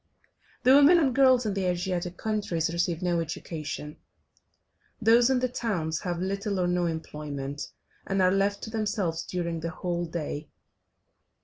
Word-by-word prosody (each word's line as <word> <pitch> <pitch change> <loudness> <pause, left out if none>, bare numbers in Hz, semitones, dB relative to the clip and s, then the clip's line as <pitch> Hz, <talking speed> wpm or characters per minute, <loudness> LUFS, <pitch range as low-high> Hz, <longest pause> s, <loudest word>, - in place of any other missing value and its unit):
The 255 +2 +6
women 290 +5 +7
and 280 -6 +2
girls 260 -2 +5
in 210 - 0
the 195 -1 -1
Asiatic 180 0 -2
countries 185 -7 -1
receive 170 0 -1
no 175 -1 +1
education, 155 -2 -5 1.0
those 235 +2 +5
in 265 - +3
the 255 0 +1
towns 190 -10 -2
have 175 -2 -3
little 195 +2 -2
or 180 - +2
no 175 0 +1
employment, 145 -3 -5 0.4
and 195 0 0
are 185 -1 +4
left 200 +1 +1
to 220 - -6
themselves 210 -7 -1
during 170 -2 -3
the 165 +1 -3
whole 175 +1 -3
day. 155 -2 -5
180 Hz, 150 wpm, -27 LUFS, 165-215 Hz, 1.0 s, women